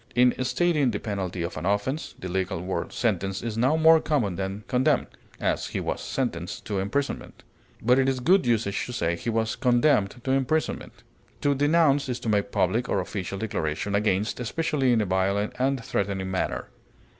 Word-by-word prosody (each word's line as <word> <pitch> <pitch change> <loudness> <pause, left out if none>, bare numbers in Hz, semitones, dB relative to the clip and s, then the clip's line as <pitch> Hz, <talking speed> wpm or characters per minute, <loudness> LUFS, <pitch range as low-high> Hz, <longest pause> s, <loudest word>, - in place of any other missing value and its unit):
In 125 0 +5
stating 145 +2 +2
the 105 -3 -2
penalty 95 -4 -3
of 85 - -5
an 80 - -4
offense, 105 +10 -1
the 95 - -6
legal 95 -1 -2
word 90 -1 -3
sentence 95 -3 -1
is 115 -2 -3
now 130 +7 +2
more 160 0 +6
common 120 - 0
than 95 +3 -4
condemn; 125 +1 +2 0.3
as, - - 0
he - - -3
was - - -3
sentenced 90 -9 -3
to 100 -2 -2
imprisonment; 125 +9 -3 0.4
but 125 +3 +4
it 135 0 +3
is 130 -1 -1
good 180 +5 +3
usage 110 -4 +1
to 125 - -6
say, 85 -9 0
he 100 - -4
was 110 0 0
condemned 125 -4 +3
to 130 - -1
imprisonment. 135 +4 -1 0.4
To 145 - +3
denounce 145 -1 +3
is 125 - -2
to 115 - -2
make 105 -1 +1
public 110 +7 +1
or 100 - +1
official 95 0 -4
declaration 100 -2 -2
against, 105 +1 +1
especially 145 +1 0
in 115 -2 +3
a - - 0
violent 95 +2 0
and 130 -2 0
threatening 95 -2 -2
manner. 95 - -2
115 Hz, 180 wpm, -26 LUFS, 95-135 Hz, 0.4 s, more